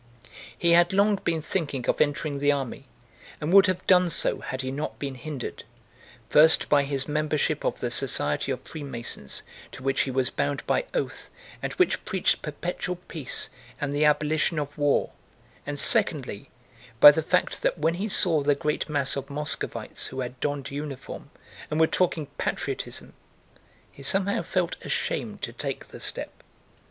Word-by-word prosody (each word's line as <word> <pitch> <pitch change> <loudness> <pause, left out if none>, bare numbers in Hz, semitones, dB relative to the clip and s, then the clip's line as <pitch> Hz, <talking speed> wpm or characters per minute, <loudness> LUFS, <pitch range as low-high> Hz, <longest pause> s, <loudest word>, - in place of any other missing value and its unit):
He 170 +4 +3
had 175 +2 +5
long 200 +1 +4
been 165 -4 -2
thinking 145 -9 -2
of - - +1
entering 145 -1 0
the 145 +1 +3
army 135 -3 -4 0.5
and 155 +4 -2
would 195 0 +8
have 185 -1 -1
done 180 -1 +5
so 165 - 0
had 130 +1 -5
he 130 - -3
not 145 +3 -4
been 140 -2 -4
hindered, 130 0 -6 0.6
first, 160 +2 +6
by 145 -1 +4
his 140 -2 -2
membership 150 0 0
of - - -1
the - - -1
Society 75 - +1
of 130 - -3
Freemasons 120 - -6 0.3
to 130 - -10
which 135 0 +1
he - - -1
was 130 -1 +1
bound 140 0 -2
by - - +1
oath - - -3 0.3
and - - -3
which 365 - +1
preached 190 -3 0
perpetual 175 +4 -4
peace 165 -6 -3 0.3
and 145 -1 -2
the 150 - +2
abolition 155 +2 +2
of 145 -1 -3
war, 145 -2 +1 0.6
and 145 0 -3
secondly, 145 - +3 0.5
by 145 - +12
the 160 - -1
fact 180 +3 0
that - - +1
when 160 +2 +1
he 195 +5 -3
saw 165 -5 +3
the 145 0 +3
great 150 +2 -2
mass 140 -2 +1
of 140 +1 -5
Muscovites 150 +1 -3
who 130 0 -5
had 125 0 -6
donned 145 -3 -2
uniform 140 -1 -6 0.4
and 155 - -1
were 160 - +7
talking 165 -2 0
patriotism, - - -3 0.8
he - - -14
somehow 195 +7 +1
felt - - -2
ashamed - - -3
to - - -3
take - - -5
the - - -10
step. - - -2
150 Hz, 165 wpm, -26 LUFS, 140-165 Hz, 0.8 s, by